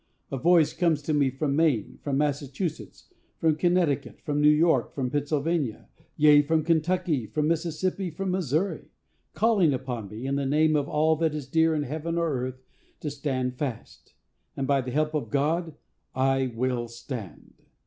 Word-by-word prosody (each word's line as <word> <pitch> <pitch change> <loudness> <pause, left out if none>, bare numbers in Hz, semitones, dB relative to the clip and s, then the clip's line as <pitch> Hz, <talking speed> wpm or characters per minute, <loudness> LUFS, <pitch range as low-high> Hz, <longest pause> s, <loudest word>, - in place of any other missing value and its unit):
A 135 - -2
voice 165 0 +4
comes 160 -4 +1
to 155 - -1
me 145 -2 +3
from 140 +2 -2
Maine, 150 -10 +1
from 140 -2 -1
Massachusetts, 145 +2 -3 0.2
from 160 -2 +2
Connecticut, 165 -4 0
from 145 0 -1
New 150 - +6
York, 150 -4 +3
from 130 -3 -2
Pennsylvania,—yea, 145 0 +1
from 155 +2 +1
Kentucky, 165 -5 +1
from 150 +5 -1
Mississippi, 170 +3 -1
from 185 +4 -3
Missouri,—calling 185 - -1
upon 125 -6 -5
me, 110 +5 -7
in 140 +1 0
the 140 - -1
name 155 +2 +3
of 145 -1 0
all 155 +1 +2
that 160 -1 0
is 150 -3 -4
dear 160 +3 +2
in 150 - 0
heaven 160 +4 -3
or 165 -3 0
earth, 130 0 -4 0.4
to 150 - -3
stand 130 -3 -3
fast; 130 -6 -6 0.4
and, 135 - -1
by 140 0 +2
the 125 - -6
help 155 +4 0
of 140 -8 -2
God, 155 +5 0 0.4
I 135 0 +2
WILL 120 0 -1
STAND. 115 - -8
150 Hz, 160 wpm, -26 LUFS, 135-160 Hz, 0.4 s, New